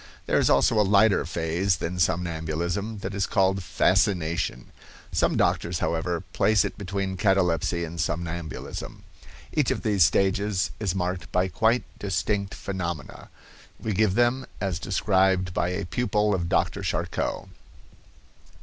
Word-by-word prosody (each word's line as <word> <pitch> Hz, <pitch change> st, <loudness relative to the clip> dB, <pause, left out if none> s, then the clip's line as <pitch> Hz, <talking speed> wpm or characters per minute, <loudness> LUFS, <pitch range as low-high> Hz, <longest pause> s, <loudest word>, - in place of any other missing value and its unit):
There -, -, +2 dB
is -, -, +3 dB
also 110 Hz, -, +4 dB
a -, -, +6 dB
lighter 100 Hz, +1 st, +4 dB
phase 85 Hz, +3 st, 0 dB
than 90 Hz, +1 st, -4 dB
somnambulism, 85 Hz, +5 st, -1 dB
that 95 Hz, +1 st, -4 dB
is 100 Hz, 0 st, -1 dB
called 95 Hz, -1 st, +2 dB
fascination. 85 Hz, -4 st, 0 dB, 0.4 s
Some -, -, +1 dB
doctors, 85 Hz, 0 st, +1 dB
however, 85 Hz, 0 st, -1 dB
place 110 Hz, -2 st, +3 dB
it -, -, -4 dB
between 95 Hz, -1 st, -3 dB
catalepsy 90 Hz, -4 st, +1 dB
and 85 Hz, +1 st, -4 dB
somnambulism. 85 Hz, -1 st, -5 dB, 0.5 s
Each 150 Hz, -4 st, +2 dB
of -, -, -2 dB
these 105 Hz, -6 st, +4 dB
stages 95 Hz, +3 st, +1 dB
is 100 Hz, -4 st, -1 dB
marked 90 Hz, 0 st, -3 dB
by 90 Hz, +1 st, +1 dB
quite 110 Hz, +9 st, +2 dB, 0.2 s
distinct 100 Hz, +1 st, -1 dB
phenomena. 85 Hz, -7 st, -5 dB, 0.5 s
We 110 Hz, -, -2 dB
give 100 Hz, -1 st, +2 dB
them 120 Hz, +3 st, +2 dB
as 95 Hz, -5 st, -2 dB
described 95 Hz, -1 st, +1 dB
by 90 Hz, -, 0 dB
a 90 Hz, +1 st, -3 dB
pupil 105 Hz, +1 st, 0 dB
of 85 Hz, -3 st, -1 dB
Dr. -, -, +1 dB
Charcot. -, -, -2 dB
95 Hz, 135 wpm, -26 LUFS, 85-100 Hz, 0.5 s, a